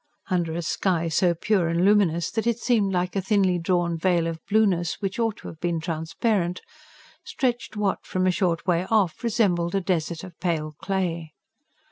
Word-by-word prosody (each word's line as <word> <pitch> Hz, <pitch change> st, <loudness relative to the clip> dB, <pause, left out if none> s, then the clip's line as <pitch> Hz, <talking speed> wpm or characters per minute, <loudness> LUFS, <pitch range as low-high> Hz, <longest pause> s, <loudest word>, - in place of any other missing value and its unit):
Under 170 Hz, -3 st, 0 dB
a 170 Hz, +1 st, -3 dB
sky 170 Hz, 0 st, 0 dB
so 170 Hz, +2 st, +2 dB
pure 190 Hz, 0 st, +1 dB
and 170 Hz, +2 st, +1 dB
luminous 185 Hz, -5 st, +3 dB
that 225 Hz, 0 st, -2 dB
it 235 Hz, -1 st, +2 dB
seemed 225 Hz, -5 st, +1 dB
like 180 Hz, 0 st, -1 dB
a 195 Hz, -, +1 dB
thinly 190 Hz, -2 st, +2 dB
drawn 170 Hz, -1 st, 0 dB
veil 175 Hz, -1 st, +2 dB
of 165 Hz, -1 st, -4 dB
blueness, 195 Hz, -6 st, +2 dB
which 195 Hz, +1 st, -3 dB
ought 225 Hz, -2 st, 0 dB
to -, -, -10 dB
have 160 Hz, -, -9 dB
been 170 Hz, -1 st, -1 dB
transparent, 170 Hz, +3 st, -1 dB, 0.6 s
stretched 245 Hz, -, -2 dB
what, 205 Hz, -2 st, 0 dB
from 185 Hz, 0 st, -1 dB
a 185 Hz, -, +4 dB
short 175 Hz, -3 st, 0 dB
way 180 Hz, 0 st, +1 dB
off, 210 Hz, -3 st, +1 dB
resembled 195 Hz, -7 st, +1 dB
a -, -, +3 dB
desert 170 Hz, -2 st, -1 dB
of 180 Hz, -3 st, -11 dB
pale 155 Hz, -4 st, -1 dB
clay. 170 Hz, -5 st, -2 dB
180 Hz, 180 wpm, -25 LUFS, 170-200 Hz, 0.6 s, a